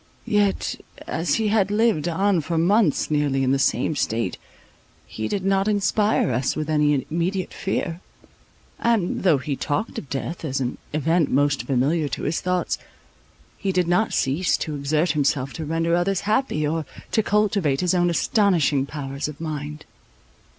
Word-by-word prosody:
Yet, 205 -2 0 0.2
as 160 -3 0
he 220 -1 +1
had 205 -2 +2
lived 210 -7 +2
on 190 +1 +2
for 165 +2 -2
months 180 -2 +2
nearly 145 -3 +1
in 130 - +2
the 135 - +2
same 135 +3 +1
state, 115 -7 -1 0.7
he 110 0 -5
did 190 - -2
not 195 +1 +2
inspire 205 - +2
us 125 +3 0
with 155 0 -3
any 150 -3 +2
immediate 180 +3 -1
fear; 180 -2 -3 0.8
and, 225 -6 +1
though 175 -6 +4
he 140 +2 -3
talked 180 +12 -2
of 140 - -12
death 160 +5 -4
as 135 -4 -2
an 125 -2 -3
event 160 +1 +1
most 145 +1 +2
familiar 145 +4 +1
to 135 - -5
his 165 - -1
thoughts, 180 0 -1 0.8
he 195 - -1
did 180 -2 +1
not 180 +6 +2
cease 145 +8 +1
to 155 - -4
exert 150 +4 +1
himself 140 -3 0
to 160 - -5
render 165 +2 0
others 180 +2 +1
happy, 210 - 0
or 160 +1 -1 0.3
to 220 - +3
cultivate 200 -9 +1
his 180 0 +1
own 175 -1 +3
astonishing 170 - +2
powers 140 -1 -4
of 150 -2 -8
mind. 150 -1 -5
165 Hz, 165 wpm, -23 LUFS, 145-190 Hz, 0.8 s, though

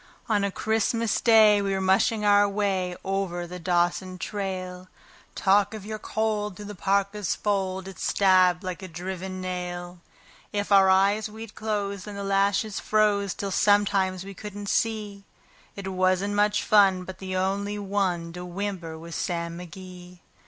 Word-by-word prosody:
On 210 -3 +1
a 200 - +1
Christmas 220 +2 0
Day 215 -3 +6
we 195 -1 -1
were 190 - 0
mushing 195 +3 +2
our 205 0 +5
way 195 -3 -1
over 190 -2 -2
the 180 +1 -8
Dawson 175 +1 0
trail. 185 -2 -5 0.5
Talk 200 +2 +3
of 210 -2 -8
your 215 0 -5
cold! 210 -2 -2
through 210 - -9
the 210 - -7
parka's 200 +1 0
fold 190 -2 -1
it 195 - -10
stabbed 185 -2 +3
like 185 -1 -5
a 190 - -7
driven 185 +2 -6
nail. 180 -1 -5 0.5
If 205 0 -3
our 195 -1 +6
eyes 200 +3 +3
we'd 220 0 -9
close, 205 -3 -3
then 210 -1 -7
the 200 - -5
lashes 200 +2 +1
froze 205 -2 +1
till 200 -1 -4
sometimes 195 -2 +2
we 195 - -8
couldn't 205 0 -7
see; 210 -3 -1 0.5
It 200 -1 -6
wasn't 185 +2 +1
much 210 0 +2
fun, 195 -3 +4
but 185 0 -9
the 185 -1 -5
only 200 +2 -1
one 190 -4 -1
to 180 0 -7
whimper 180 -3 -5
was 165 +1 -10
Sam 170 0 -3
McGee. 180 0 -11
195 Hz, 160 wpm, -26 LUFS, 185-205 Hz, 0.5 s, Day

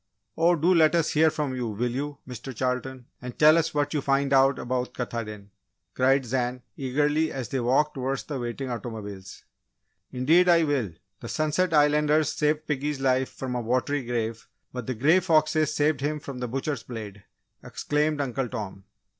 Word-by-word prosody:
"Oh, 170 +2 +4
do 170 +3 +3
let 160 -1 +4
us 165 -2 +1
hear 160 +1 +5
from 150 -4 -3
you, 125 -2 -2
will 120 +3 -2
you, 140 +3 -4
Mr. 125 +1 -8
Charlton? 130 +1 -3 0.2
and 125 -1 -8
tell 155 +1 +7
us 165 -1 +1
what 145 0 -1
you 150 - 0
find 140 0 +1
out 135 0 +5
about 125 0 -3
Katahdin?" 110 -4 -5 0.4
cried 135 +1 +2
Zan, 125 0 -2
eagerly, 145 +4 0
as 130 -5 -5
they 135 - -1
walked 130 +5 +2
towards 135 0 -3
the 145 -4 -5
waiting 125 +2 -4
automobiles. 105 -4 -7 0.7
"Indeed, 160 +8 +3
I 170 -1 +5
will! 135 - -1 0.3
The - - -8
Sunset 155 +4 0
Islanders 150 0 +3
saved 150 0 0
piggy's 150 -1 -2
life 130 -1 +1
from 130 -1 -6
a 125 - -1
watery 130 +4 0
grave, 115 -2 -3 0.3
but 125 -3 -6
the 130 - -2
Grey 155 +11 +4
Foxes 155 -3 +2
saved 145 -2 +1
him 150 +2 -1
from 140 -3 -8
the 125 - -3
butcher's 135 +1 -3
blade!" 105 -4 -8 0.4
exclaimed 150 0 -1
Uncle 135 -1 -2
Tom. 100 -5 -6
135 Hz, 175 wpm, -26 LUFS, 125-150 Hz, 0.7 s, tell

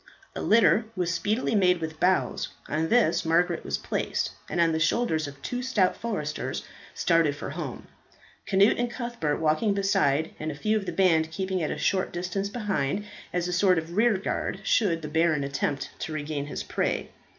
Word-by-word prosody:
A - - -3
litter 225 0 +4
was 180 -2 0
speedily 215 +7 0
made 180 -4 +4
with 160 -1 -5
boughs, 185 +1 +1 0.2
on 160 +2 -1
this 240 -1 +3
Margaret 170 +1 +1
was 70 0 -2
placed, 70 - -2 0.2
and - - -2
on 165 -1 +4
the 160 - 0
shoulders 160 -2 +1
of 140 -1 -10
two 245 0 -3
stout 215 -8 +2
foresters 175 -10 -3 0.3
started 165 -4 +2
for 145 - -6
home, 150 -5 -6 0.6
Cnut 195 +4 +4
and 240 0 0
Cuthbert 235 - -2
walking 160 +7 +2
beside, 175 -7 +1
and 155 0 -3
a - - -7
few 215 +9 0
of 210 -3 -2
the - - -1
band 165 -4 +3
keeping 190 +2 -2
at 155 - -1
a - - -3
short 190 -1 0
distance 185 +3 -3
behind, 205 - -1 0.3
as 175 0 -1
a 180 - -2
sort 185 0 +4
of 165 +2 -4
rear 220 0 +4
guard 195 - -3
should 170 -8 +2
the - - -3
Baron 160 -1 +2
attempt 140 0 -2
to 160 - -4
regain 145 -1 -3
his - - -4
prey. - - -2
175 Hz, 185 wpm, -27 LUFS, 155-200 Hz, 0.6 s, litter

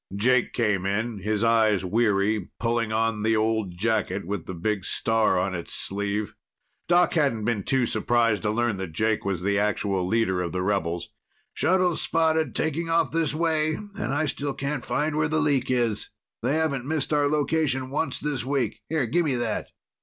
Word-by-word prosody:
Jake 125 +4 +2
came 105 -5 +1
in, 110 +2 -1
his 105 +2 -1
eyes 110 -4 +3
weary, 105 0 +1
pulling 115 -1 0
on 110 -1 0
the 110 +1 +2
old 110 -4 0
jacket 105 -1 0
with 100 -2 -4
the 95 - -5
big 100 +3 -1
star 110 -1 +1
on 95 +1 0
its 85 -2 -5
sleeve. 100 +1 -2 0.5
Doc 175 0 +4
hadn't 135 -9 +1
been 115 -3 0
too 130 +4 +1
surprised 115 -3 +1
to 105 - 0
learn 115 -1 0
that 95 -4 -5
Jake 110 +5 0
was 95 -3 -2
the 100 +1 +1
actual 100 -2 0
leader 95 -3 +1
of 85 -2 -3
the 90 0 -1
rebels. 85 -4 -1 0.4
"Shuttles 180 -2 +2
spotted 160 -3 +1
taking 160 +2 -1
off 165 0 +2
this 160 -2 0
way. 155 -1 +1
And 205 -4 -5
I 145 +3 +1
still 145 -1 -3
can't 140 -1 -3
find 150 +1 -1
where 155 +1 +2
the 155 - +1
leak 145 -4 +1
is. 120 -4 0 0.3
They 130 +5 +1
haven't 140 -5 0
missed 155 0 -1
our 145 -1 +3
location 145 -3 0
once 155 +3 -1
this 150 -4 -2
week. 135 0 -1
Here, 155 -4 +1
give 170 +9 +1
me 140 -4 +1
that." 120 -3 -2
115 Hz, 185 wpm, -25 LUFS, 105-150 Hz, 0.5 s, Doc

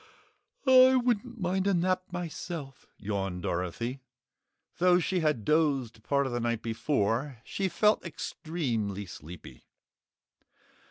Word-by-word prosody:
"I 260 0 +8
wouldn't 240 -1 0
mind 190 +1 0
a 200 - +3
nap 185 +1 0
myself," 165 -5 -6
yawned 95 -3 -3
Dorothy. 105 +9 -3 0.8
Though 180 0 +5
she 180 +1 0
had 150 -10 0
dozed 140 -7 +1
part 140 +5 +1
of 130 - -3
the 120 - 0
night 115 -1 -1
before, 115 +2 0
she 195 -1 -2
felt 210 +3 +3
extremely 120 - -3
sleepy. 85 -1 -11
145 Hz, 115 wpm, -29 LUFS, 115-185 Hz, 0.8 s, I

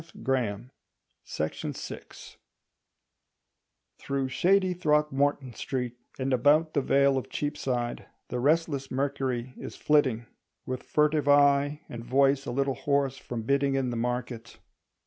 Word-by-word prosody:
The - - -18
Rural 135 +3 0
Pan 120 -6 0
(An 120 +6 -13 0.7
April 80 - -5
Essay) - - -9 1.6
Through 135 -1 -2
shady 185 +7 +3
Throgmorton 150 -5 +1
Street 125 0 -3 0.2
and 130 0 -1
about 150 +6 +3
the 140 - +2
vale 140 0 +3
of - - -10
Cheapside 130 -5 -3 0.2
the 125 - -2
restless 145 -1 +1
Mercury 130 -2 -2
is - - -8
flitting, 130 -6 +2 0.4
with 130 0 -4
furtive 150 -1 +1
eye 145 +1 +4
and 115 -1 -7
voice 135 +3 +2
a - - -2
little 135 +2 0
hoarse 140 0 0
from 120 -3 -6
bidding 140 +2 +1
in 130 -2 0
the - - -3
market. 120 0 -4
135 Hz, 135 wpm, -28 LUFS, 125-145 Hz, 1.6 s, eye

